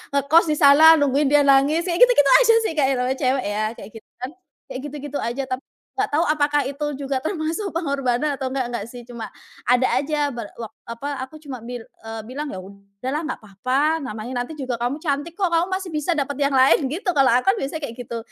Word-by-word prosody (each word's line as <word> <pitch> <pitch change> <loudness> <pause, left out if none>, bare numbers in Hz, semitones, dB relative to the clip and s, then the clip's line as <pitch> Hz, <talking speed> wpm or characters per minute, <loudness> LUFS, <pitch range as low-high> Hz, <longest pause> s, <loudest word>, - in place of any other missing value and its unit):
ngekos 300 +5 +4
di 305 - +2
sana, 305 +3 +8
nungguin 285 0 +2
dia 290 0 +5
nangis, 280 +4 +4
ya 360 - -1
gitu-gitu 485 - +6
aja, 460 -2 +5
sih, - - 0
Kak, 295 -3 +2
ya - - +2
namanya 250 +1 -1
cewek 260 -2 +1
ya, 215 - 0
kayak 195 - -10
gitu, - - -37
kan. 255 +2 -5 0.4
Kayak - - -4
gitu-gitu 290 0 -6
aja, 240 +4 -2
tapi 255 0 -4 0.3
nggak 405 +1 -1
tau 310 +4 +1
apakah 295 -1 +2
itu 280 +3 -4 0.2
juga 270 -1 -1
termasuk 325 +5 -2
pengorbanan 280 -3 0
atau 265 - -2
enggak 260 -1 -2
enggak 235 -4 -4
sih, 245 0 -10
cuma 235 -2 -7 0.4
ada 250 +1 +4
aja 290 0 -1
ba 235 - -5 0.2
wak 225 -3 -7 0.2
apa, 235 +5 -6
aku 260 +4 -8
cuma 265 -5 -7
bil 240 0 -7 0.2
eee, 225 0 -6
bilang, 285 +5 -5
"Ya 190 - -6
udah 200 +5 -9
lah 300 - -1
nggak 330 - -4
papa, 260 +10 0
namanya 245 0 -4
nanti 305 +6 -7
juga 260 -3 -3
kamu 245 +4 -1
cantik, 295 +2 -2
kok. 370 -4 0
Kamu 335 +2 +2
masih 375 -1 -3
bisa 305 +3 0
dapet 285 -1 -1
yang 280 -1 +2
lain!" 265 +1 +4
Gitu, 340 +10 -5
kalau 275 -3 +4
aku 245 +2 +3
kan - - -3
biasanya 290 +4 -4
kayak 230 - -8
gitu. 235 - -4
275 Hz, 225 wpm, -22 LUFS, 250-305 Hz, 0.4 s, sana